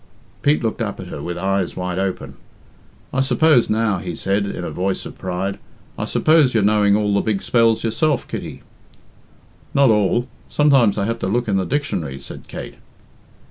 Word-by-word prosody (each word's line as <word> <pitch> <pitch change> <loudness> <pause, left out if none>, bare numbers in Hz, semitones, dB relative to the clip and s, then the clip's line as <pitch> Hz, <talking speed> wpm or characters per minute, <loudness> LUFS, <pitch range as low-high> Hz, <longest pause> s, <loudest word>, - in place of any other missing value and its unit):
Pete 145 -1 +2
looked 115 +1 -2
up 105 -3 -3
at 90 -2 -8
her 70 - -6
with 85 +3 -4
eyes 95 0 -1
wide 90 0 -3
open. 95 -1 -3 0.8
"I 135 - +2
suppose, 135 0 +3
now," 110 -3 +1
he 85 -2 -5
said, 100 +3 0
in 90 - -5
a - - -4
voice 95 +1 -2
of - - -10
pride, 95 +2 -3 0.4
"I - - -3
suppose 155 -6 +3
you're 110 - +3
knowing 105 -1 +4
all 105 -1 +1
the 100 - +2
big 105 -3 -1
spells 115 -2 +3
yourself, 140 +5 0
Kitty?" - - -7 1.1
"Not 140 -4 +5
all. 105 +3 +2 0.2
Sometimes 135 -9 +4
I 100 - 0
have 115 +2 -2
to - - -2
look 120 +5 0
in 100 -2 +1
the 95 - 0
dictionary," 125 - -2
said - - -10
Kate. - - -8
105 Hz, 180 wpm, -20 LUFS, 95-120 Hz, 1.1 s, Not